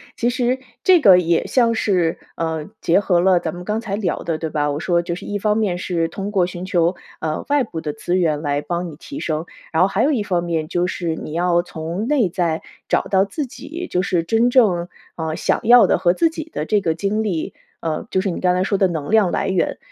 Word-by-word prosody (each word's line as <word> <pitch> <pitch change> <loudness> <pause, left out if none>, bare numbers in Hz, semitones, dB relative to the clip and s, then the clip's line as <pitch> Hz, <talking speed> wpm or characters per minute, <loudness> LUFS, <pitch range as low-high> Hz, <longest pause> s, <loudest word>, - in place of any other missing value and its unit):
其 240 - +1
实 250 +1 0 0.2
这 365 -3 +6
个 195 -8 +8
也 170 -2 +1
像 235 -3 +3
是， 180 -7 +1 0.2
呃， 160 -2 -3
结 170 - +3
合 185 -4 +2
了 180 0 +4
咱 170 -1 -4
们 180 0 -8
刚 215 +3 -1
才 210 -4 -3
聊 205 -3 -1
的 165 -2 -2
对 160 - -3
吧？ 150 -1 0
我 145 0 -2
说 175 +1 +1
就 170 0 -4
是 - - -9
一 205 0 -3
方 210 +1 +1
面 195 -5 0
是 170 -3 -1
通 195 +4 -5
过 195 -4 +2
寻 175 0 -6
求， 175 -2 +2 0.3
呃， 155 -1 -2
外 285 -1 +3
部 165 -8 -6
的 150 -2 -3
资 175 +4 -2
源 160 -4 +1
来 145 -1 0
帮 175 +3 -3
你 - - -11
提 280 - -8
升， 160 - -2 0.3
然 160 - +3
后 185 - +5
还 195 +2 0
有 295 - +3
一 255 -7 +1
方 180 -4 -1
面 165 -3 -2
就 175 +2 0
是 175 -3 -2
你 155 - -7
要 175 +1 +2
从 170 +4 -5
内 265 -9 +2
在 165 -2 -1 0.3
找 - - +2
到 190 0 +2
自 275 +8 -4
己， 340 +8 -7
就 180 - 0
是 180 -3 +1
真 225 +8 +2
正， 185 -9 +3 0.3
呃， 160 -1 -3
想 - - 0
要 240 +1 +7
的 - - +3
和 175 -1 +3
自 330 - +2
己 320 0 -6
的 - - -2
这 210 - +3
个 165 -5 0
经 200 +6 -1
历。 180 -7 -3 0.3
呃， 160 -2 -3
就 190 - +2
是 195 +1 0
你 175 - -4
刚 180 -1 +3
才 180 - +1
说 200 +1 +1
的 190 -1 +3
能 155 -4 -4
量 215 -5 +4
来 - - -1
源， 190 -1 0
180 Hz, 265 characters per minute, -20 LUFS, 165-210 Hz, 0.3 s, 个